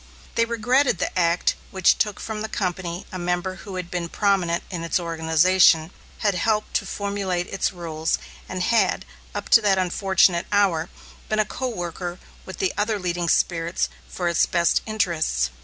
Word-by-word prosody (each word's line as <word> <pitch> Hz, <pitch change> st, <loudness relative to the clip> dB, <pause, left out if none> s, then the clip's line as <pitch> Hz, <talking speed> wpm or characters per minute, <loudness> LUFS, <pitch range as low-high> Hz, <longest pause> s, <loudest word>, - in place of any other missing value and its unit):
They 230 Hz, -, +2 dB
regretted 240 Hz, +2 st, +2 dB
the -, -, -2 dB
act 170 Hz, -1 st, +2 dB, 0.2 s
which 190 Hz, -2 st, +3 dB
took 210 Hz, -2 st, 0 dB
from 220 Hz, -1 st, -5 dB
the 220 Hz, -, -4 dB
company 180 Hz, -3 st, -3 dB
a 185 Hz, -, -5 dB
member 175 Hz, +2 st, -2 dB
who 195 Hz, -1 st, -9 dB
had 180 Hz, -1 st, -5 dB
been 175 Hz, -1 st, -3 dB
prominent 190 Hz, -4 st, +1 dB
in 170 Hz, -2 st, -4 dB
its 170 Hz, -, 0 dB
organization, 165 Hz, 0 st, +3 dB, 0.3 s
had 205 Hz, -, +4 dB
helped 210 Hz, +4 st, 0 dB
to 195 Hz, -, -6 dB
formulate 195 Hz, -3 st, -2 dB
its 195 Hz, -, -1 dB
rules, 165 Hz, -3 st, -2 dB, 0.3 s
and 185 Hz, -1 st, -2 dB
had, 195 Hz, -3 st, +2 dB, 0.3 s
up 205 Hz, -, -4 dB
to 230 Hz, -, +7 dB
that 200 Hz, -2 st, +3 dB
unfortunate 185 Hz, -1 st, +2 dB
hour, 185 Hz, -5 st, +2 dB, 0.4 s
been 215 Hz, -, 0 dB
a 215 Hz, -, +3 dB
co 260 Hz, +4 st, -4 dB
worker 175 Hz, -4 st, -4 dB, 0.3 s
with -, -, -8 dB
the 385 Hz, -2 st, 0 dB
other 215 Hz, +1 st, +1 dB
leading 175 Hz, -2 st, -2 dB
spirits 170 Hz, +1 st, +1 dB, 0.2 s
for 180 Hz, -, -3 dB
its 170 Hz, -, +3 dB
best 170 Hz, -1 st, +2 dB
interests. 165 Hz, -, 0 dB
185 Hz, 170 wpm, -23 LUFS, 170-205 Hz, 0.4 s, to